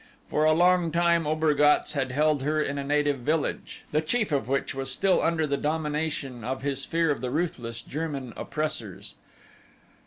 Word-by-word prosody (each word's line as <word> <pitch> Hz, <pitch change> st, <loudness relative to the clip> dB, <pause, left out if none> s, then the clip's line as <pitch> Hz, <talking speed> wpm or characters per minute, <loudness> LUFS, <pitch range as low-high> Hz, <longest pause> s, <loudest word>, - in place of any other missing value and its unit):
For 150 Hz, -, +2 dB
a 155 Hz, -, +5 dB
long 175 Hz, +1 st, +3 dB
time 170 Hz, -1 st, +2 dB
Obergatz 150 Hz, -2 st, +3 dB
had 135 Hz, -3 st, -1 dB
held 150 Hz, +1 st, +2 dB
her 155 Hz, +3 st, 0 dB
in 140 Hz, -2 st, -1 dB
a -, -, -3 dB
native 145 Hz, -1 st, +1 dB
village, 150 Hz, +4 st, -2 dB
the 155 Hz, -, +2 dB
chief 210 Hz, +5 st, 0 dB
of 135 Hz, -6 st, 0 dB
which 135 Hz, +2 st, -1 dB
was 135 Hz, 0 st, -2 dB
still 190 Hz, +7 st, +2 dB
under 165 Hz, -1 st, +1 dB
the 140 Hz, -1 st, -1 dB
domination 150 Hz, -4 st, -2 dB
of 130 Hz, +3 st, -4 dB
his 140 Hz, -1 st, -2 dB
fear 165 Hz, -2 st, +1 dB
of 140 Hz, -, -2 dB
the 125 Hz, -, -2 dB
ruthless 125 Hz, -7 st, -3 dB
German 140 Hz, -5 st, -4 dB
oppressors. 150 Hz, -11 st, -4 dB
150 Hz, 175 wpm, -26 LUFS, 135-160 Hz, -, a